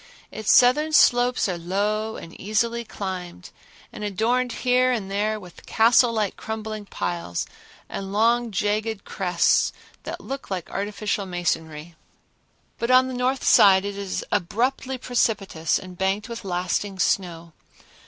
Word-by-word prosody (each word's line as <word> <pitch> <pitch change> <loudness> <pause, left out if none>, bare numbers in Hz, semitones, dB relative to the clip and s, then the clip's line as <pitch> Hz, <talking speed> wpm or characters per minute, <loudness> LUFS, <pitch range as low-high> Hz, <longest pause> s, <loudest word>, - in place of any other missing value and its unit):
Its 215 -1 0
southern 295 +6 +5
slopes 250 -5 +4
are 180 -3 -3
low 210 +5 -1
and 165 - -10
easily 230 +4 0
climbed, 185 - -7 0.4
and 210 - -7
adorned 235 +5 0
here 255 0 +4
and 205 -6 -3
there 215 +2 0
with 180 -4 -14
castle 235 +2 +4
like 215 -3 -1
crumbling 220 -1 -6
piles 85 - -3 0.4
and 195 -1 -6
long 230 +3 +2
jagged 210 +1 -1
crests 180 -2 +2 0.3
that - - -6
look 275 0 -7
like 185 -4 -4
artificial 205 0 -2
masonry; 165 -2 -3 0.9
but 235 - -2
on 255 0 +5
the - - -5
north 255 +1 -1
side 195 -1 +6
it 200 0 -4
is 200 -2 -4
abruptly 255 +8 -1
precipitous 210 -10 0
and 185 -1 -10
banked 195 +3 0
with 235 -1 -7
lasting 185 +2 -2
snow. 170 -3 -1
210 Hz, 135 wpm, -24 LUFS, 185-235 Hz, 0.9 s, side